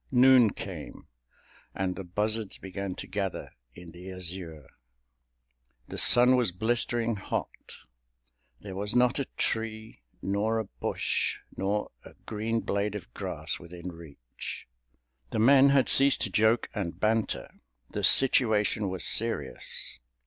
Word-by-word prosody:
Noon 125 -2 +6
came, 85 -7 -9 0.7
and 95 -1 -2
the 95 - -7
buzzards 105 +4 -2
began 95 0 -6
to - - -7
gather 100 -3 -4 0.2
in 90 -1 -12
the 90 +3 -10
azure. 90 -4 -6 1.2
The - - -3
sun 125 +1 +8
was 125 -6 +2
blistering 115 +3 -1
hot—there - - -10
was 105 +3 -3
not 125 +2 +3
a 140 - -1
tree, 110 - -3 0.2
nor 105 +3 -1
a 110 - -1
bush, - - -2 0.2
nor 100 +2 -2
a - - -15
green 110 +1 -2
blade 100 +1 -2
of 90 -12 -9
grass - - -4
within 85 +1 -9
reach. 75 -8 -10 0.6
The - - -4
men 135 +5 +6
had 140 -2 +3
ceased 140 0 +4
to 105 - -1
joke 110 +4 +2
and 95 -6 -5
banter. 110 0 -2 0.3
The - - -4
situation 110 -5 +5
was 95 -1 -4
serious. 115 - 0
105 Hz, 125 wpm, -28 LUFS, 90-115 Hz, 1.2 s, sun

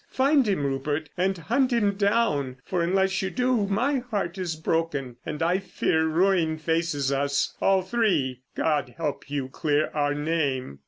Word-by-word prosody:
Find 275 -1 +3
him, 190 -8 0
Rupert, 145 +3 -2
and 190 +1 0
hunt 255 - +1
him 210 -4 +2
down, 200 - +1
for 180 -2 -1
unless 190 +2 +1
you 190 - -1
do 250 -2 +1
my 255 +8 +1
heart 205 -8 -3
is 175 -3 -2
broken, 155 -6 -2
and 155 0 -2
I 175 +3 +2
fear 160 -4 0
ruin 165 -1 +2
faces 160 -3 0
us—all 140 +7 +1
three. 180 - 0
God 155 -2 0
help 150 -4 -3
you 140 -2 -2
clear 150 +2 0
our 145 -1 0
name. 145 - -1
165 Hz, 155 wpm, -26 LUFS, 145-195 Hz, -, Find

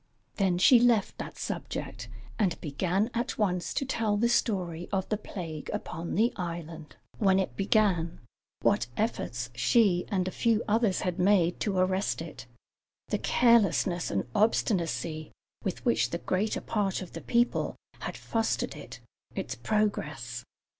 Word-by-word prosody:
Then 190 -3 +2
she 235 +7 +7
left 235 -4 +3
that - - -6
subject, - - -5 0.3
and 190 -6 +1
began 185 - 0
at 240 +2 -2
once 180 -5 0
to 275 - 0
tell 225 -5 0
the 235 +3 +2
story 180 -8 0
of 190 -2 0
the 215 - +2
plague 170 -7 -6
upon 165 +2 -4
the 230 +5 +3
island 170 -3 -6 0.2
when 195 -3 +4
it 190 - -1
began, 195 -5 +2 0.4
what - - +3
efforts 125 - -2
she 180 - +3
and 185 -3 0
a - - -2
few 230 +1 +2
others 215 -2 +2
had 180 -1 -2
made 180 -2 +3
to 200 -3 -1
arrest 185 +1 +1
it, 150 -6 -8 0.6
the - - 0
carelessness 200 -7 +3
and 100 - -1
obstinacy 170 -7 0 0.3
with 190 - -3
which 240 - +3
the 170 - -2
greater 195 +5 -1
part 195 -3 -1
of 180 - -12
the 165 - -6
people 240 +1 +1 0.2
had - - -5
fostered 225 -1 -1
it, - - -10 0.3
its - - -3
progress. 150 - -1
190 Hz, 145 wpm, -29 LUFS, 170-215 Hz, 0.6 s, she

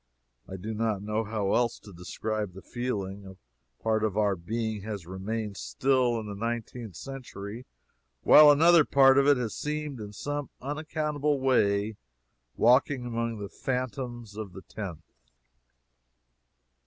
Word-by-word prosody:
I 95 - -7
do 105 +4 -5
not 110 -2 -1
know 105 +1 -1
how 105 -2 -1
else 120 -1 +2
to 100 - -14
describe 105 +3 -4
the 95 - -11
feeling. 100 -5 -4
A 65 -10 -18
part 110 -1 +1
of 105 -2 0
our 105 -2 +2
being 110 +4 -3
has 100 -4 -6
remained 100 +3 -4
still 130 -3 +1
in 110 - -6
the 105 - -5
nineteenth 115 -1 -4
century, 125 -3 -8 0.6
while 150 0 +9
another 165 +3 +7
part 135 -1 +6
of 140 - +3
it 145 -2 +6
has 115 -4 -2
seemed 150 -3 -4
in 105 -1 -7
some 145 +6 -4
unaccountable 150 0 -1
way 105 -5 +2 0.6
walking 125 +2 +4
among 115 -1 -2
the 100 -1 -5
phantoms 125 -4 -4
of 105 -4 -6
the 95 - -10
tenth. 90 -7 -7
110 Hz, 140 wpm, -28 LUFS, 100-130 Hz, 0.6 s, while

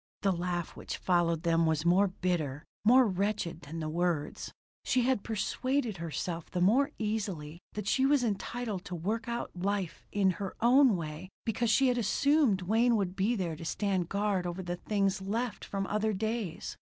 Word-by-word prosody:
The 195 - +4
laugh 175 -1 -2
which - - -5
followed 170 -2 +1
them 165 -1 +3
was 160 0 0
more 185 +4 +5
bitter, 170 -6 -2 0.2
more 250 +4 +7
wretched 195 -3 -1
than 160 +2 -7
the 155 - -3
words. 170 -1 -1 0.3
She 255 - +2
had 255 -4 +2
persuaded 240 +1 -1
herself 165 0 -4
the 180 - -2
more 235 +10 +4
easily 195 -8 -3
that 210 -2 -5
she 265 +4 +3
was 280 -2 +3
entitled 215 -2 -2
to 180 - -5
work 215 +7 -2
out 235 0 -3
her 175 - -8
life 195 -3 -2
in 195 -2 +3
her 195 - -4
own 250 0 +5
way 160 +2 -6 0.2
because 230 +1 0
she 265 +4 +4
had 245 -1 +1
assumed 245 -2 +3
Wayne 230 +5 +3
would 190 -4 -1
be 205 +5 +1
there 175 -6 -2
to 155 - -9
stand 185 +2 -1
guard 200 -3 0
over 175 +2 -4
the 175 0 -3
things 195 0 0
left 225 +4 -2
from 195 -1 -3
other 215 +2 0
days. 215 -2 -3
195 Hz, 180 wpm, -31 LUFS, 175-225 Hz, 0.3 s, more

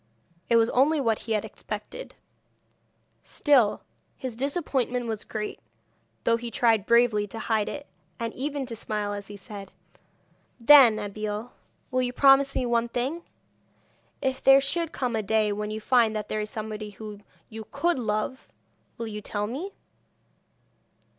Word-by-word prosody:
It 235 - +4
was 230 0 +4
only 290 +5 +3
what 225 -5 +1
he 225 - -3
had 210 - 0
expected; - - -7 1.1
still, 260 -8 +2 0.3
his 255 -3 -5
disappointment 260 -3 -1
was 220 -2 -3
great, 210 -1 -5 0.6
though 230 - +3
he 235 0 -6
tried 225 -2 +2
bravely 235 -3 +4
to 225 - -9
hide 220 -1 0
it, 290 -1 -6 0.3
and 230 -1 -3
even 280 +1 -3
to 240 -2 -6
smile 210 -2 -3
as 205 -1 -6
he 205 - -9
said: 200 -1 -9 0.9
'Then, 245 -3 +8
Abeille, 210 +2 -4 0.4
will 255 0 +2
you 250 0 -1
promise 275 +1 +5
me 255 - 0
one 235 0 +1
thing? 260 +8 -2 1.0
If 265 -1 -1
there 270 0 +8
should 325 +4 -1
come 250 -6 -2
a 220 - 0
day 215 0 +1
when 210 +1 -3
you 215 0 -4
find 225 -1 +3
that 210 -1 -4
there 215 - -1
is 210 - -4
somebody 215 -1 -5
whom 210 0 -9 0.3
you 220 -1 -8
could 330 +2 0
love, 220 +3 -2 0.5
will 230 - -4
you 210 -1 -6
tell 205 0 -2
me?' 285 - -5
230 Hz, 155 wpm, -26 LUFS, 215-260 Hz, 1.1 s, Then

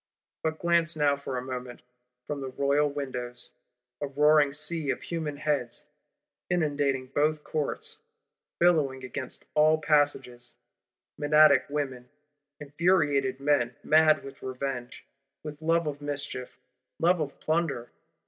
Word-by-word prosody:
But 160 0 -1
glance 170 -1 +2
now, 145 -2 +3
for 140 -2 -5
a 125 - -3
moment, 125 -1 -7 0.4
from 145 -1 -4
the 135 - -4
royal 140 +3 +1
windows! 125 -4 -5 0.5
A 145 - -1
roaring 150 +1 +4
sea 150 +1 -2
of - - -2
human 160 -4 -4
heads, 145 -5 -2 0.6
inundating 145 -6 0
both 150 +3 0
Courts; 440 - -3 0.6
billowing 150 -7 +2
against 130 +1 -6
all 155 +1 +5
passages: 135 -6 0 0.6
Menadic 150 +1 +5
women; 135 -4 -3 0.5
infuriated 145 -4 +1
men, 135 -4 +1
mad 155 0 +5
with 135 0 -11
revenge, 130 -1 -5 0.4
with 150 0 -8
love 165 +1 +2
of 145 -1 -4
mischief, 145 -3 -5 0.4
love 175 +1 +3
of 145 -3 -4
plunder! 155 -7 -1
145 Hz, 120 wpm, -28 LUFS, 135-155 Hz, 0.6 s, all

